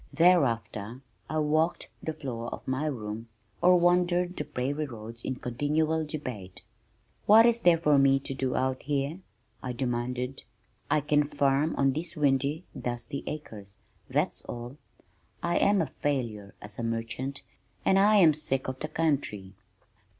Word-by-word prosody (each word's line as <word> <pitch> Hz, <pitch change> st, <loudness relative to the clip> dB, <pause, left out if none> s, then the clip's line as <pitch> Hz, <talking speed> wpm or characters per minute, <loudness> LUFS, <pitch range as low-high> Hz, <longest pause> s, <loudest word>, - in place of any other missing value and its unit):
Thereafter 125 Hz, -, +2 dB, 0.3 s
I 155 Hz, -, -1 dB
walked 155 Hz, +2 st, +1 dB
the 160 Hz, -, -3 dB
floor 120 Hz, -6 st, -5 dB
of -, -, -8 dB
my 130 Hz, +4 st, -1 dB
room 115 Hz, -4 st, -5 dB, 0.3 s
or 180 Hz, 0 st, +6 dB
wandered 175 Hz, +1 st, +2 dB
the -, -, -3 dB
prairie 145 Hz, +1 st, -2 dB
roads 115 Hz, -1 st, -8 dB
in 130 Hz, -, -2 dB
continual 155 Hz, +6 st, 0 dB
debate. 125 Hz, -, -6 dB, 0.6 s
"What 220 Hz, +2 st, +8 dB
is 235 Hz, 0 st, +4 dB
there 175 Hz, -6 st, +5 dB
for 150 Hz, -3 st, +4 dB
me 135 Hz, 0 st, +5 dB
to 135 Hz, -, -5 dB
do 130 Hz, -1 st, -2 dB
out 130 Hz, 0 st, 0 dB
here?" 145 Hz, +4 st, -2 dB, 0.4 s
I 125 Hz, -, -4 dB
demanded. 125 Hz, +1 st, -2 dB, 0.5 s
"I 150 Hz, -, +3 dB
can 150 Hz, +1 st, +3 dB
farm 140 Hz, +2 st, +1 dB
on 135 Hz, -1 st, +2 dB
these 165 Hz, +4 st, -4 dB
windy 145 Hz, +3 st, +1 dB
dusty 120 Hz, +3 st, -4 dB
acres 105 Hz, -10 st, -7 dB, 0.3 s
that's -, -, 0 dB
all. 120 Hz, +3 st, -7 dB, 0.7 s
I 170 Hz, 0 st, +1 dB
am 200 Hz, -3 st, +4 dB
a 140 Hz, -, -7 dB
failure 115 Hz, -9 st, -2 dB
as 105 Hz, +2 st, -7 dB
a -, -, -2 dB
merchant 115 Hz, +4 st, -3 dB, 0.4 s
and 190 Hz, -, +5 dB
I 210 Hz, +2 st, +5 dB
am 170 Hz, -6 st, +7 dB
sick 140 Hz, -3 st, -2 dB
of 130 Hz, 0 st, -4 dB
the 155 Hz, -, -3 dB
country." 140 Hz, -12 st, -1 dB
140 Hz, 150 wpm, -28 LUFS, 120-155 Hz, 0.7 s, What